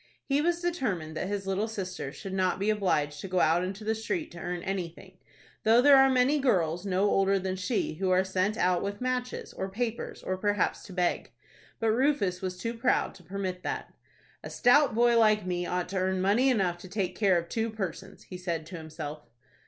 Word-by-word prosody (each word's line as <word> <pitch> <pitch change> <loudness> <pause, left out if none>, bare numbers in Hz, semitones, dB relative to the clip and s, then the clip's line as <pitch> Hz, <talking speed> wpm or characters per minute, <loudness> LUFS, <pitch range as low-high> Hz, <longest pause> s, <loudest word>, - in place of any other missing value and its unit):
He 280 +1 +1
was 345 +2 0
determined 210 - -2
that 185 - -2
his 200 -1 -3
little 195 +3 -1
sister 185 -9 -5
should 190 +5 -8
not 185 -1 +1
be 200 +3 +1
obliged 150 -8 0
to - - -5
go 185 -1 0
out 165 +2 +3
into 195 +3 -5
the 220 +1 +1
street 310 - -3
to 170 - -10
earn 175 0 -4
anything, 185 -4 -5 0.4
though 225 +2 +5
there 280 +2 +7
are 270 0 +7
many 260 +3 +3
girls, 180 - +1
no 190 +2 +2
older 195 0 +3
than 190 0 -2
she, 190 +2 -1
who 185 +4 -2
are 185 0 +4
sent 190 +3 0
out 180 -4 +2
with 200 0 -4
matches, 250 0 -3
or 190 - -4
papers, 230 +3 -4
or 185 - -2
perhaps 205 0 0
to 190 - -10
beg. 180 -1 -1 0.5
But 225 -1 +2
Rufus 225 -7 +1
was 185 -1 -4
too 230 +6 -3
proud 240 +2 +1
to 180 - -16
permit 185 0 -4
that. - - -4 0.5
"A - - -6
stout 255 -1 +4
boy 235 0 +4
like 215 -3 +4
me 175 -1 -2
ought 180 0 -2
to 195 - -3
earn 185 0 0
money 210 +8 +3
enough 190 -8 +1
to 185 - -11
take 190 -2 -2
care 195 -4 +3
of 170 0 -3
two 225 +4 -1
persons," 195 -3 -6
he 185 - -9
said 170 -3 -3
to 180 +2 -8
himself. 155 -2 -7
195 Hz, 210 wpm, -28 LUFS, 180-225 Hz, 0.5 s, there